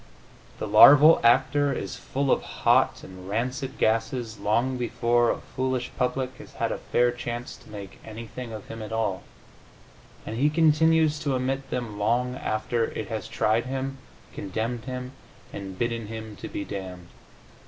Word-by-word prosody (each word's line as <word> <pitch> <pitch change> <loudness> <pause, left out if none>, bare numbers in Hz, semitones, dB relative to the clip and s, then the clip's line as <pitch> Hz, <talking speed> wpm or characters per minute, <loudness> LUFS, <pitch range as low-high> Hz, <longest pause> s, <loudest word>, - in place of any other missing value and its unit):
The - - -4
larval 145 +9 +9
actor 140 +4 +4
is 100 -8 -4
full 135 0 -2
of - - +3
hot - - +2
and 95 0 -10
rancid 130 +5 -2
gases 115 0 0
long 115 +5 +1
before 120 -1 +1
a - - +1 0.2
foolish 130 -1 -1
public 130 0 -1
has - - -13
had - - -1
a - - -3
fair 120 0 +2
chance 120 0 -5
to - - -18
make 100 -3 -9
anything 115 +2 -8
of 110 -2 -8
him 115 0 -7
at 110 - -7
all, 110 -4 -1 1.0
and 110 - -5
he 145 +4 +3
continues 160 0 +3
to 140 -3 -1
emit 135 +2 -2
them 115 -4 -4
long 120 +4 +1
after 115 -1 -1
it 110 -2 -6
has 110 -4 -4
tried 115 +3 +1
him, 135 +1 -3 0.3
condemned 110 +4 -3
him 125 -1 -5 0.4
and 95 -2 -7
bidden 115 -1 -2
him 110 -1 -7 0.2
be 100 - -4
damned. 90 -3 -7
120 Hz, 155 wpm, -26 LUFS, 110-130 Hz, 1.0 s, larval